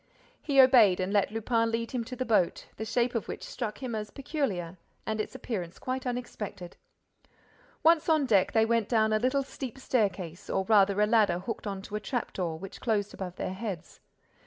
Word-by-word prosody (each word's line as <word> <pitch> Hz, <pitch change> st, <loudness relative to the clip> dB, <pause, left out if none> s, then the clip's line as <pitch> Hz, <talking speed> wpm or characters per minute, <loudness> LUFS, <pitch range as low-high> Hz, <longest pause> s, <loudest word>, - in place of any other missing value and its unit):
He 280 Hz, -3 st, +2 dB
obeyed 240 Hz, -8 st, +7 dB
and 185 Hz, +2 st, -1 dB
let 205 Hz, -2 st, +3 dB
Lupin 225 Hz, +1 st, 0 dB
lead 230 Hz, 0 st, -2 dB
him 245 Hz, -2 st, -2 dB
to 255 Hz, +2 st, -6 dB
the 255 Hz, -, -3 dB
boat, 210 Hz, -7 st, +1 dB
the 220 Hz, -, -4 dB
shape 240 Hz, +2 st, +1 dB
of 230 Hz, -, -2 dB
which -, -, -6 dB
struck 235 Hz, +1 st, -5 dB
him 245 Hz, -2 st, -3 dB
as 210 Hz, -1 st, -3 dB
peculiar 200 Hz, -, -3 dB, 0.3 s
and 220 Hz, 0 st, -1 dB
its -, -, -7 dB
appearance 180 Hz, -7 st, -5 dB
quite 255 Hz, 0 st, -3 dB
unexpected. 215 Hz, -7 st, -5 dB, 1.1 s
Once 330 Hz, 0 st, +4 dB
on 310 Hz, -3 st, +4 dB
deck, 200 Hz, -7 st, +3 dB
they 220 Hz, -1 st, +4 dB
went 230 Hz, -2 st, +1 dB
down 220 Hz, -2 st, +3 dB
a 215 Hz, -, +3 dB
little 260 Hz, +4 st, +1 dB
steep 265 Hz, -2 st, -7 dB
staircase, 195 Hz, -9 st, -1 dB
or 190 Hz, -, +1 dB
rather 200 Hz, -1 st, +4 dB
a -, -, +6 dB
ladder 210 Hz, -5 st, +3 dB
hooked 205 Hz, +4 st, -5 dB
on 195 Hz, -1 st, -4 dB
to 210 Hz, -, -7 dB
a -, -, -1 dB
trap 245 Hz, +1 st, -3 dB
door, 170 Hz, -4 st, -2 dB
which 195 Hz, +3 st, -9 dB
closed 210 Hz, -4 st, 0 dB
above 185 Hz, -2 st, -6 dB
their 185 Hz, -, -3 dB
heads. 190 Hz, -5 st, -6 dB
220 Hz, 200 wpm, -29 LUFS, 195-250 Hz, 1.1 s, obeyed